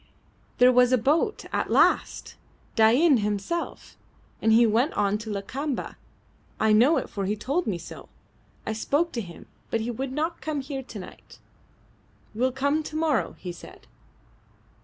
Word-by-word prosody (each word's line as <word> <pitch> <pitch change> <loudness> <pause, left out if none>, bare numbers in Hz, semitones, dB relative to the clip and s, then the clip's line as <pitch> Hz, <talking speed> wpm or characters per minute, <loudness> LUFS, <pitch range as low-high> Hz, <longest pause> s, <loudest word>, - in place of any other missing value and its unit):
"There 250 +1 +6
was 250 0 +4
a 255 - +5
boat. 310 - +1
At - - -1
last! - - +2 0.4
Dain 250 +6 +5
himself; 210 +11 -3 0.5
and 220 - +3
he 235 +2 +6
went 230 +7 +2
on 205 0 +1
to 220 0 -8
Lakamba. 255 +8 -4 0.6
I 220 0 +3
know 250 +9 +5
it, - - -2
for 200 -2 -4
he 205 +2 0
told 280 - -2
me 195 -5 -1
so. - - -11 0.6
I 220 - -2
spoke 290 +9 0
to 235 - -3
him, 170 -5 -11 0.2
but 225 - -1
he 235 +2 -2
would 260 +3 -4
not 315 +5 -2
come 305 -2 -2
here 270 0 -5
to 245 -4 -10
night. 185 - -12 1.0
Will 250 +4 +1
come 280 +4 0
to 310 0 -8
morrow, 315 -2 0
he 180 - -6
said." 170 - -13
250 Hz, 160 wpm, -26 LUFS, 215-290 Hz, 1.0 s, There